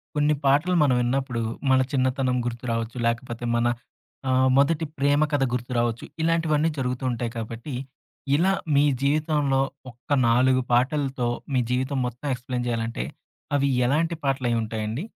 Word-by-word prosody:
కొన్ని 150 Hz, +1 st, +3 dB
పాటలు 150 Hz, +7 st, +3 dB
మనం 135 Hz, -4 st, +3 dB
విన్నప్పుడు 125 Hz, -1 st, -1 dB, 0.3 s
మన 130 Hz, -, +5 dB
చిన్నతనం 130 Hz, -1 st, +1 dB
గుర్తు 120 Hz, 0 st, -4 dB
రావచ్చు, 115 Hz, +1 st, -3 dB
లేకపోతే 120 Hz, 0 st, -3 dB
మన 120 Hz, +1 st, +2 dB, 0.6 s
ఆహ్, 130 Hz, 0 st, +4 dB
మొదటి 155 Hz, +3 st, +3 dB
ప్రేమ 145 Hz, +1 st, +3 dB
కథ 145 Hz, -2 st, +2 dB
గుర్తు 125 Hz, +1 st, -3 dB
రావచ్చు. 120 Hz, -1 st, 0 dB, 0.2 s
ఇలాంటివన్నీ 165 Hz, -1 st, +2 dB
జరుగుతూ 125 Hz, -1 st, -2 dB
ఉంటాయి 120 Hz, -1 st, -3 dB
కాబట్టి, 115 Hz, +5 st, -6 dB, 0.6 s
ఇలా 180 Hz, +6 st, +3 dB, 0.2 s
మీ 140 Hz, -, +5 dB, 0.2 s
జీవితంలో 145 Hz, -1 st, +1 dB, 0.3 s
ఒక్క 120 Hz, +4 st, -18 dB, 0.2 s
4 130 Hz, +2 st, +4 dB
పాటలతో 130 Hz, 0 st, +1 dB, 0.3 s
మీ -, -, +4 dB
జీవితం 130 Hz, +2 st, 0 dB
మొత్తం 125 Hz, +4 st, -5 dB
ఎక్స్‌ప్లేన్ 125 Hz, 0 st, -4 dB
జేయాలంటే 115 Hz, -, -2 dB, 0.5 s
అవి 140 Hz, 0 st, +2 dB, 0.2 s
ఎలాంటి 160 Hz, +5 st, +1 dB
పాటలైయుంటాయండి? 115 Hz, -2 st, -1 dB
130 Hz, 135 wpm, -25 LUFS, 120-145 Hz, 0.6 s, మన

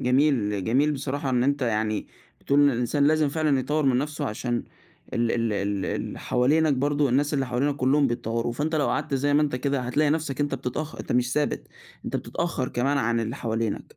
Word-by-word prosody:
جميل 125 Hz, -7 st, +2 dB
جميل 140 Hz, +6 st, +2 dB
بصراحة 140 Hz, 0 st, -3 dB
إن 125 Hz, -1 st, +2 dB
أنت 140 Hz, 0 st, +1 dB
يعني 110 Hz, -2 st, 0 dB, 0.3 s
بتقول 140 Hz, +1 st, +2 dB
إن 145 Hz, -1 st, +6 dB
الإنسان 125 Hz, +4 st, +1 dB
لازم 155 Hz, -1 st, +3 dB
فعلًا 150 Hz, -2 st, +1 dB
يطوَّر 150 Hz, +3 st, 0 dB
من 130 Hz, -2 st, +3 dB
نَفسه 150 Hz, +1 st, -3 dB
عشان 120 Hz, +2 st, -2 dB, 0.5 s
ال 115 Hz, 0 st, +1 dB
ال 115 Hz, -2 st, 0 dB
ال 100 Hz, -1 st, -1 dB
ال -, -, -4 dB
حوالينك 150 Hz, +5 st, +2 dB
برضو، 145 Hz, +1 st, +1 dB
الناس 145 Hz, +4 st, +1 dB
اللي 135 Hz, -2 st, 0 dB
حوالينك 140 Hz, +4 st, 0 dB
كلّهم 140 Hz, +2 st, +3 dB
بيتطوروا، 115 Hz, -1 st, -2 dB
فأنت 150 Hz, +6 st, -2 dB
لو 150 Hz, -, +2 dB
قعدت 140 Hz, -, -1 dB
زي 145 Hz, +2 st, +1 dB
ما 150 Hz, -, +4 dB
أنت 140 Hz, -4 st, 0 dB
كده 140 Hz, +1 st, -1 dB
هتلاقي 145 Hz, +4 st, +1 dB
نَفسك 150 Hz, -3 st, -1 dB
أنت 145 Hz, -1 st, 0 dB
بتتأخ 135 Hz, +5 st, -4 dB
أنت -, -, -4 dB
مش 125 Hz, +1 st, +1 dB
ثابت، 150 Hz, -1 st, -1 dB, 0.4 s
أنت -, -, -2 dB
بتتأخر 160 Hz, -7 st, -2 dB
كمان 140 Hz, +4 st, 0 dB
عن 115 Hz, -1 st, +1 dB
اللي 115 Hz, +4 st, -3 dB
حوالينك. 115 Hz, -2 st, -3 dB
135 Hz, 200 wpm, -25 LUFS, 120-145 Hz, 0.5 s, إن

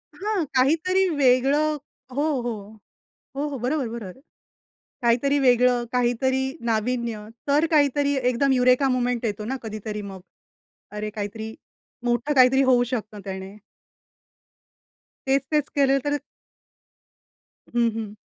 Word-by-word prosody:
हां, 410 Hz, -4 st, -1 dB
काहीतरी 330 Hz, +9 st, +3 dB
वेगळं 280 Hz, +3 st, +3 dB, 0.4 s
हो, 285 Hz, -, +1 dB, 0.2 s
हो, 240 Hz, 0 st, -2 dB, 0.8 s
हो, 285 Hz, +2 st, -1 dB
हो, 285 Hz, -2 st, -4 dB
बरोबर-बरोबर. 235 Hz, -6 st, -3 dB, 0.8 s
काहीतरी 250 Hz, +4 st, +2 dB
वेगळं, 250 Hz, -2 st, +3 dB
काहीतरी 250 Hz, +2 st, +1 dB, 0.3 s
नाविन्य 230 Hz, 0 st, -1 dB, 0.3 s
तर 295 Hz, +3 st, +3 dB
काहीतरी 285 Hz, -2 st, +3 dB, 0.2 s
एकदम 270 Hz, +3 st, +2 dB
युरेका 255 Hz, +1 st, +4 dB
मूव्हमेंट 250 Hz, -2 st, 0 dB
येतो 210 Hz, -1 st, -2 dB
ना 260 Hz, +5 st, -3 dB
कधीतरी 215 Hz, -1 st, -5 dB
मग. 195 Hz, -2 st, -8 dB, 0.7 s
अरे 210 Hz, 0 st, -4 dB
काहीतरी 220 Hz, +1 st, -6 dB, 0.5 s
मोठं 240 Hz, +4 st, 0 dB
काहीतरी 265 Hz, 0 st, +6 dB
होऊ 255 Hz, -2 st, +4 dB
शकतं 215 Hz, -3 st, -5 dB
त्याने. 190 Hz, +1 st, -7 dB, 1.7 s
तेच-तेच 275 Hz, +2 st, +1 dB
केलं 275 Hz, -1 st, +4 dB
तर 290 Hz, 0 st, 0 dB, 1.6 s
हं, 235 Hz, -1 st, +3 dB
हं. 215 Hz, -2 st, -5 dB
250 Hz, 110 wpm, -24 LUFS, 225-280 Hz, 1.7 s, काहीतरी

